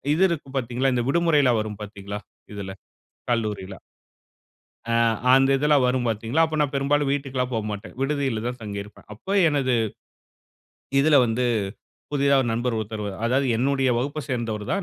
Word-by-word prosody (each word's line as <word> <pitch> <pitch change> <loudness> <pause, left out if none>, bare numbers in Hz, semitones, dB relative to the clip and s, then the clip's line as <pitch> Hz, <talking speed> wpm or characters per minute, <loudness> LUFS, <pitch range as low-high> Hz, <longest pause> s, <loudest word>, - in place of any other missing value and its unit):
இது 180 - +3
இருக்கும் 140 -5 -5
பார்த்தீங்களா, 125 +1 0
இந்த 120 - +1
விடுமுறைல்லாம் 145 -7 +3
வரும் 105 -1 -6
பார்த்தீங்களா, 100 0 -7 0.3
இதுல 100 -2 -6 0.6
கல்லூரியில. 105 -4 -2 1.2
ஆ - - +2 0.4
அந்த 135 0 +5
இதெல்லாம் 145 -1 +3
வரும் 125 0 0
பார்த்தீங்களா, 115 +8 +1
அப்ப 155 -1 -3
நான் 145 -2 0
பெரும்பாலும் 140 +1 +1
வீட்டுக்கெல்லாம் 135 -3 -2
போகமாட்டேன், 105 -1 -4
விடுதியில 135 -5 0
தான் 125 +1 -5
தங்கியிருப்பேன். 105 -1 -8
அப்ப 110 - -14 0.2
எனது 140 -4 +1 1.3
இதில 150 +2 +5
வந்து, 120 +2 0 0.7
புதிதா 140 -1 +3
ஒரு 120 - -2
நண்பர் 120 +1 -1
ஒருத்தர் 110 0 -4
வ - - -2 0.2
அதாவது 130 +4 +2
என்னுடைய 135 +1 +1
வகுப்பை 140 +5 -2
சேர்ந்தவர் 115 -4 -2
தான். 195 - 0
125 Hz, 145 wpm, -24 LUFS, 110-140 Hz, 1.3 s, அந்த